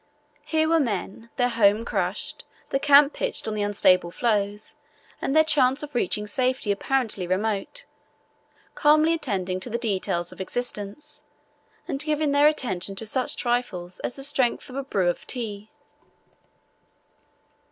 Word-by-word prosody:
Here 315 0 +1
were 330 0 +4
men, 225 - -3
their 245 -1 +2
home 220 -1 +3
crushed, - - -3 0.3
the 270 - +1
camp 285 +1 +6
pitched - - -2
on 220 - -2
the 210 - -2
unstable 185 -3 +3
floes, 205 +1 -1 0.5
and 270 - -1
their 315 - +7
chance 275 -2 +2
of 295 -1 -7
reaching 210 -3 0
safety 255 0 0
apparently 215 -3 -1
remote, 210 - -1 0.9
calmly 305 +2 +4
attending 185 - -2
to 215 - -6
the 235 - -1
details 190 -6 -1
of - - -9
existence 210 +3 -4 0.6
and 275 - -3
giving 300 -1 0
their 285 +1 +5
attention 195 -10 -1
to 225 - -4
such 255 +4 0
trifles 210 -8 -2
as - - -3
the 275 - -5
strength 265 -3 0
of - - -9
a 275 - -1
brew 195 -9 0
of 175 - -2
tea. 215 -4 -4
235 Hz, 145 wpm, -25 LUFS, 200-275 Hz, 0.9 s, their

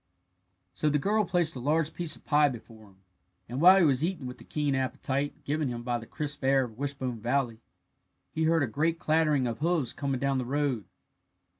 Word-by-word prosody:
So 155 - 0
the 150 - +2
girl 210 +7 +1
placed 170 -3 +1
a - - -5
large 155 +4 0
piece 170 -3 -1
of - - -19
pie 150 -1 +4
before 110 -3 -11
him; 95 -1 -23 0.4
and 125 +5 -4
while 185 +3 +8
he 185 - +5
was 140 -1 +3
eating 170 -5 -2
with 125 0 -7
the - - -12
keen 150 -2 -1
appetite 135 +1 -2
given 150 0 0
him 120 -1 -4
by 120 -1 -1
the 115 - -11
crisp 145 -2 -4
air 135 0 +4
of 115 -2 -9
Wishbone 135 -4 -3
Valley, 120 -1 -1 0.7
he 160 0 -1
heard 165 -1 +3
a - - 0
great 155 +8 0
clattering 155 -4 +2
of 115 -2 -3
hoofs 155 -6 0
coming 140 -3 -2
down 140 0 0
the - - -1
road. 135 -5 -1
140 Hz, 205 wpm, -28 LUFS, 125-155 Hz, 0.7 s, while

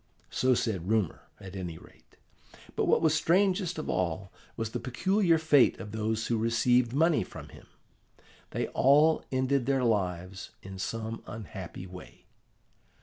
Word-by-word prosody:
So 130 0 +2
said 100 -7 -2
rumour, 110 -6 0
at 95 0 -10
any 90 -4 -5
rate. - - -19 0.6
But - - +1
what - - +3
was 155 -2 +4
strangest 180 +2 +2
of 155 - -4
all 90 +1 -2 0.3
was 115 -1 -3
the - - -3
peculiar 180 - +2
fate 155 -4 +4
of 105 - -7
those 110 +1 -1
who 115 -2 0
received 115 +1 +2
money 155 - +3
from - - -10
him: - - -15 0.8
they - - -2
all 150 +4 +4
ended 130 -1 +1
their 135 -2 +2
lives 95 -4 -1
in 95 0 -8
some 110 +4 -4
unhappy 105 -4 -8
way. 90 0 -12
115 Hz, 145 wpm, -29 LUFS, 95-145 Hz, 0.8 s, was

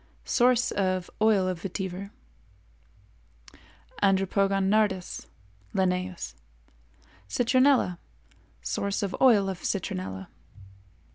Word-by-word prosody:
Source 250 0 +3
of 185 -2 -1
Oil 210 -4 +4
of 180 -2 -3
Vetiver. 190 0 -4 1.4
4. - - -22 0.4
Andropogon 195 0 +2
nardus 200 -3 0 0.5
L.—Citronella. 175 - -1 0.6
Source 200 - -2
of 195 - -2
Oil 220 -7 +6
of 190 -2 -4
Citronella. 95 - -3
190 Hz, 75 wpm, -27 LUFS, 175-205 Hz, 1.4 s, Oil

